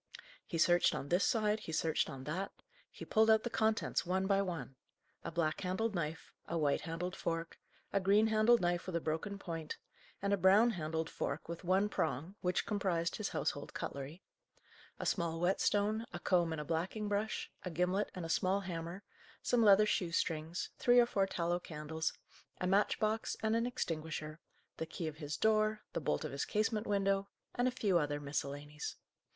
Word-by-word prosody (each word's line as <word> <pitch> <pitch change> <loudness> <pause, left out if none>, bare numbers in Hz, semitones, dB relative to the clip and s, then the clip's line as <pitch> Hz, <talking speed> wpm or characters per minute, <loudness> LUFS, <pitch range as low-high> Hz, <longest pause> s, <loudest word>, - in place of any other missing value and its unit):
He 170 - -3
searched 175 +2 +4
on 140 0 -4
this 175 +3 +3
side, 215 -1 +2
he 165 - -7
searched 160 0 +1
on 135 -1 -7
that; 180 +7 -3 0.4
he - - -9
pulled 220 +1 +4
out 220 0 +5
the 240 - -3
contents, 220 -1 +1
one 190 +2 0
by 195 0 +3
one: 170 -8 -4 0.5
a - - -3
black 165 -2 0
handled 200 +4 -1
knife, 160 -2 -4
a 170 - -1
white 145 -3 +2
handled 175 +3 -4
fork, 165 0 -3 0.3
a 200 - +3
green 200 +3 +4
handled 220 +2 +4
knife 175 0 0
with 185 - -3
a - - +2
broken 165 +6 -2
point, 165 -5 -5 0.4
and 200 +1 0
a - - +3
brown 200 +6 +6
handled 160 -3 -2
fork - - -4
with 170 +2 -6
one 190 +3 +3
prong, 160 -2 -2
which 180 0 0
comprised 180 -5 0
his 215 - -2
household 145 - -3
cutlery; 140 +6 -5 0.8
a - - -3
small 170 -3 0
whetstone, 205 +5 +1
a 175 - -5
comb 175 -2 +2
and 160 - -3
a 150 - -4
blacking 180 +7 -2
brush, 205 +1 -1
a 180 - -3
gimlet 180 +4 0
and 180 -3 -4
a - - -3
small 185 +4 +1
hammer, 175 +1 -5 0.4
some 245 - +3
leather 210 -1 +7
shoe 180 -4 0
strings, 165 +1 -1
three 245 0 +6
or 240 - +7
four 195 -4 +1
tallow 175 -1 0
candles, 160 -1 -3 0.5
a - - -1
match 195 +3 +3
box 215 +1 0
and 220 0 +2
an 230 +1 +1
extinguisher, 155 -7 -3 0.4
the 160 - -3
key 165 0 -4
of 155 -1 -6
his 150 -1 -4
door, 215 0 +2
the - - -2
bolt 75 - 0
of - - -4
his 140 - -2
casement 215 +1 0
window, 195 -1 +1 0.3
and 245 +1 +1
a - - +2
few 200 -8 +2
other 145 -1 -1
miscellanies. 145 +1 -4
180 Hz, 190 wpm, -35 LUFS, 160-210 Hz, 0.8 s, leather